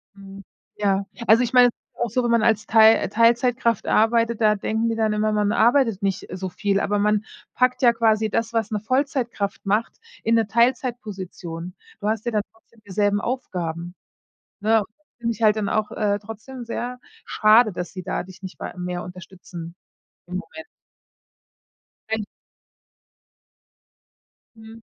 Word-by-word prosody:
Mhm, 195 0 -12 0.3
ja, 200 -1 +1 0.2
also 225 +3 +6
ich 240 - -3
meine, 250 -1 +7
es 240 - -2
ist - - -71
ja - - -2
auch - - -5
so, 250 +3 0
wenn 235 - +1
man 230 -1 +3
als 215 -2 +2
Teil 220 0 +6
äh, - - -3
Teilzeitkraft 235 0 +2
arbeitet, 230 +1 +2
da 210 -1 +4
denken 220 +3 -1
die 225 - -1
dann 220 -1 +1
immer, 215 0 +1
man 210 -1 +1
arbeitet 235 -3 +3
nicht 195 -1 -1
so 185 0 -4
viel, 200 +1 0
aber 205 0 0
man 210 +1 +1 0.3
packt 250 0 +2
ja 240 -2 +6
quasi 220 -1 +2
das, 230 +2 -1
was 225 -1 -1
'ne 210 - -1
Vollzeitkraft 240 -5 -2
macht, 210 +4 0 0.2
in 230 +1 +2
'ne 225 -2 +2
Teilzeitposition. 205 -8 -2 0.3
Du 205 - -3
hast 220 +1 -1
ja 240 - -1
dann 210 -1 0
trotzdem 225 0 -27
dieselben 205 +1 +1
Aufgaben, 175 -8 -4 0.7
ne? 220 0 +3 0.4
Finde 230 -1 -1
ich 230 - -15
halt 215 0 +5
dann 210 -2 -1
auch, 215 -1 -1
äh, 205 -1 0
trotzdem 225 +4 -9
sehr 245 +2 -4 0.3
schade, 215 +1 +5
dass 180 0 -6
sie 185 - -6
da - - -3
dich 185 +1 -14
nicht 190 - -9
wei - - -6
mehr 180 0 -4
unterstützen 180 -1 -10 0.5
im 180 +1 -4
Moment. 320 - -9 1.4
Wenn 220 -1 -1 2.3
Mhm. 220 +1 -13
215 Hz, 165 wpm, -23 LUFS, 200-230 Hz, 2.3 s, meine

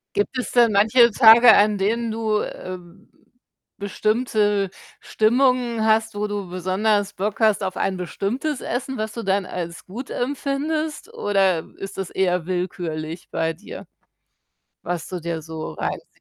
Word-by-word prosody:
Gibt 205 +6 -1
es 250 - -3
denn 235 -2 +4
manche 225 +4 +5
Tage, 230 +1 +8
an 205 0 +4
denen 225 +4 0
du, 220 -1 0
ähm, 185 +1 -9 0.7
bestimmte 210 -1 0 0.3
Stimmungen 240 0 +2
hast, 220 0 +2
wo 210 +1 -1
du 205 -2 -4
besonders 195 +3 0
Bock 205 +3 -3
hast 215 -2 +3
auf 185 -1 -3
ein 190 -1 -1
bestimmtes 245 - -3
Essen, 260 +2 -3
was 215 0 -3
du 230 - -5
dann 195 0 0
als 170 -2 -6
gut 235 +8 -8
empfindest? 290 +4 -2
Oder 195 -5 +1
ist 195 - -8
das 195 -2 -4
eher 180 -3 0
willkürlich 175 -2 -4
bei 165 0 -1
dir, 175 +6 -11 0.9
was 175 -2 -4
du 185 - -4
dir 165 -1 -4
so 160 - -7
reinziehst? - - -4
205 Hz, 145 wpm, -22 LUFS, 185-230 Hz, 0.9 s, Tage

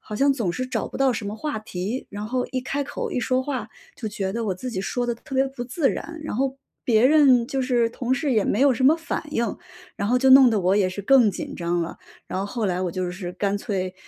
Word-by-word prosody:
好 215 - -8
像 275 +4 +3
总 225 -10 -1
是 255 +6 -3
找 - - -2
不 - - -8
到 270 -1 +4
什 210 -2 -4
么 205 - -4
话 285 +3 -3
题。 215 +3 -4
然 205 +1 -5
后 250 +2 -1
一 255 - -1
开 280 +2 -2
口、 465 - -4
一 - - -1
说 255 +1 +1
话 255 -6 -4 0.3
就 230 - -6
觉 195 -2 -3
得 230 +1 -2
我 195 - -1
自 255 +8 -6
己 190 -5 -3
说 245 +5 -2
得 240 - 0
特 270 +4 -10
别 265 +1 +3
不 265 -2 -6
自 270 +3 0
然， 330 -1 -6
然 305 - -4
后 265 +1 0 0.3
别 225 -1 +4
人 265 -5 +5
就 270 +1 -2
是 245 -3 +1
同 250 +2 -1
事 280 0 -1
也 215 -4 +2
没 215 - 0
有 280 -1 +5
什 255 +2 -1
么 300 +5 +6
反 330 -1 -4
应， 235 -7 -1 0.4
然 200 - -2
后 245 - +3
就 265 +1 +4
弄 265 -1 +9
得 215 -3 +1
我 185 +2 +2
也 195 -3 +3
是 195 +2 -6
更 250 -1 +5
紧 185 - -6
张 170 0 -1
了。 165 - -6 0.3
然 - - -4
后 195 - -2
后 220 +1 -2
来， 180 -1 -1
我 180 - -1
就 180 +1 -3
是 180 -1 -6
干 200 +2 -1
脆 190 -4 -3
240 Hz, 290 characters per minute, -24 LUFS, 200-265 Hz, 0.4 s, 弄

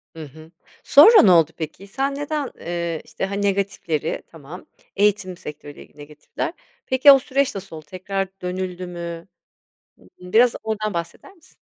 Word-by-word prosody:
Hı 160 - -8
hı. 155 +3 -15 0.3
Sonra 420 +11 +8
ne 190 - +5
oldu 165 -4 +4
peki? 165 +5 -7
Sen 275 +7 -2
neden, 290 -1 -3
eee, 170 -1 -4
işte - - -4
hani 200 +1 -4
negatifleri, 195 -6 -2
tamam 165 +3 -12 0.3
eğitim 200 -3 +1
sektörüyle 145 -1 -10
ilgili - - -28
negatifler? 150 - -6 0.3
Peki 260 +2 +6
o 275 - +7
süreç 270 -2 -1
nasıl 195 -4 -8
oldu? 155 -1 -11
Tekrar 195 +2 -3
dönüldü 180 0 -4
mü? 170 -1 -7 0.7
Imm, 180 0 -16
biraz 240 +1 +5
oradan 215 -2 -3
bahseder 170 - -6
misin? 335 -5 -23
185 Hz, 155 wpm, -21 LUFS, 165-220 Hz, 0.7 s, Sonra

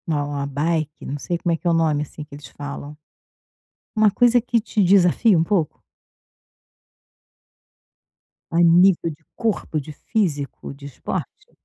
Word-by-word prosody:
Não. 145 -2 -1
A 140 0 -2
bike 150 +2 -2
não 145 - -4
sei 175 +4 -2
como 170 0 -1
é - - 0
que 175 - -5
é - - +4
o - - +3
nome, 160 -3 +2
assim, 150 +1 -9
que 150 - -16
eles 145 - -11
falam, 145 +1 -8 1.0
uma 215 -1 +4
coisa 245 +4 +4
que 240 0 +1
te 210 -1 0
desafia 190 +2 +4
um 160 - +3
pouco? 165 -4 -1 2.7
A 165 - +2
nível 170 0 +5
de 160 0 -11
corpo, 215 -8 -2
de 150 +1 -9
físico, 150 -9 -3
de 140 0 -13
esporte? 140 - -6
165 Hz, 155 wpm, -22 LUFS, 145-190 Hz, 2.7 s, nível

